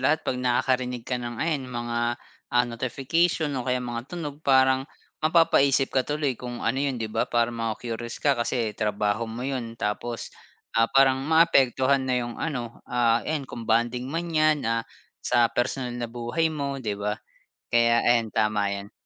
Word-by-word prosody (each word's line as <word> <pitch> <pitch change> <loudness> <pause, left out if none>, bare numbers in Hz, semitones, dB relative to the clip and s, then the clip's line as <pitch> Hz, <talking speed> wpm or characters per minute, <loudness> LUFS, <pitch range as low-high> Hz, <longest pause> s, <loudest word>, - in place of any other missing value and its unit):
lahat 155 +5 +2
'pag 125 - -1
nakakarinig 125 -1 0
ka 125 0 -2
ng 120 -1 -5
ayan 145 -3 -1
mga, 120 -1 -2 0.3
ah, 120 0 +3
notification 135 +7 0
o - - -6
kaya 125 - +2
mga 120 +1 -5
tunog, 150 -5 -6
parang 130 -1 +3 0.3
mapapaisip 140 -4 +3
ka 130 - +3
tuloy 150 -2 0
kung 120 -1 -6
ano 135 - +1
'yun, 140 -2 0
di 115 - -3
ba, - - 0
para 120 0 +1
maku-curious 115 +1 -4
ka 145 - +4
kasi 115 -2 -1
trabaho 105 +1 -1
mo 120 +3 -5
'yun 125 -4 -4
tapos, 115 +2 -3 0.4
ah, 115 0 +3
parang 135 -1 +4
maapektuhan 135 -4 +4
na 130 - +2
'yung 120 0 -7
ano, 125 -8 -4
ah, 120 -1 +2
ayan, 155 -3 -3
kung 120 -3 -8
bonding 120 +2 +1
man 165 +3 -3
'yan, 155 -1 +3
ah, 115 0 +1 0.4
sa 120 -1 +3
personal 125 0 -1
na 120 -1 -4
buhay 120 +8 -1
mo, 140 -3 -3
'di 105 -5 -3
ba? 105 +1 -3 0.5
Kaya 115 0 +4
ayan, 115 -2 +3
tama 105 -2 +1
'yan. 100 +1 -5
125 Hz, 170 wpm, -26 LUFS, 115-135 Hz, 0.5 s, ka